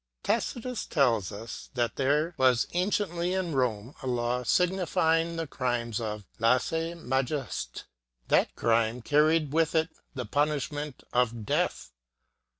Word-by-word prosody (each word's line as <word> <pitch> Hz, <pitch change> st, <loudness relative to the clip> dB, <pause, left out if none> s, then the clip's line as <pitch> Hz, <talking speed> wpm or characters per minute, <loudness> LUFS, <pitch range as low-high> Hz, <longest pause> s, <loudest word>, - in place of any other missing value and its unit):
Tacitus 245 Hz, -2 st, -1 dB
tells 115 Hz, -, +2 dB
us 110 Hz, +3 st, -8 dB
that 120 Hz, -2 st, 0 dB
there 150 Hz, +5 st, +1 dB
was 130 Hz, -2 st, +4 dB
anciently 180 Hz, -1 st, 0 dB
in 180 Hz, -4 st, -1 dB
Rome 125 Hz, -2 st, 0 dB
a 135 Hz, -, -5 dB
law 120 Hz, 0 st, 0 dB
specifying 170 Hz, +1 st, +2 dB
the 165 Hz, 0 st, -2 dB
crimes 120 Hz, -5 st, -2 dB
of 105 Hz, -2 st, -4 dB
"16se 160 Hz, +8 st, +1 dB
majest^." 135 Hz, +2 st, -2 dB, 0.4 s
That -, -, +2 dB
crime 115 Hz, +1 st, +1 dB
car 150 Hz, +3 st, +4 dB
ried 155 Hz, -2 st, +1 dB
with 165 Hz, 0 st, +2 dB
it 160 Hz, +1 st, +2 dB, 0.3 s
the 125 Hz, -2 st, -3 dB
punishment 145 Hz, -1 st, -1 dB
of 120 Hz, -3 st, +1 dB
death. -, -, -1 dB
140 Hz, 130 wpm, -28 LUFS, 120-165 Hz, 0.4 s, was